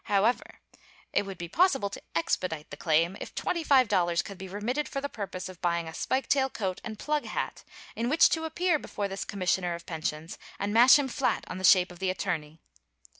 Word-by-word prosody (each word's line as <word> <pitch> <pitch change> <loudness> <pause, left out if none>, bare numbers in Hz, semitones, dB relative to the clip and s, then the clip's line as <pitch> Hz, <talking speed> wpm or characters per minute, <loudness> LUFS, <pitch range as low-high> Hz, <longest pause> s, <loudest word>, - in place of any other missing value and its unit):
However, 210 +4 +1 0.5
it 200 - +1
would 195 -2 -7
be 170 - -5
possible 270 - +2
to - - -8
"expedite" 165 -2 -1
the - - -5
claim, 165 +4 +2
if - - -8
$25 250 - +2
could 200 -2 -9
be 190 - -7
remitted 225 +10 -2
for 275 - -3
the 285 - -3
purpose 190 -5 -5
of 185 -2 -11
buying 170 -1 0
a 160 - -7
spike 260 +9 -1
tail 270 -1 +2
coat 190 -7 -3
and 220 -1 -6
plug 300 +5 -1
hat, - - -4 0.3
in 235 +1 -1
which 325 +4 +6
to 320 -1 -1
appear 345 0 +1
before 205 -6 -4
the 195 0 -6
commissioner 180 -2 0
of 170 - -11
pensions 160 0 -4 0.2
and 205 +1 -2
mash 245 +5 +8
him 285 -2 0
flat 255 - 0
on 185 - -6
the - - -7
shape 185 0 +6
of 175 - -13
the 190 -1 0
attorney. 170 -4 -3
195 Hz, 205 wpm, -28 LUFS, 175-260 Hz, 0.5 s, mash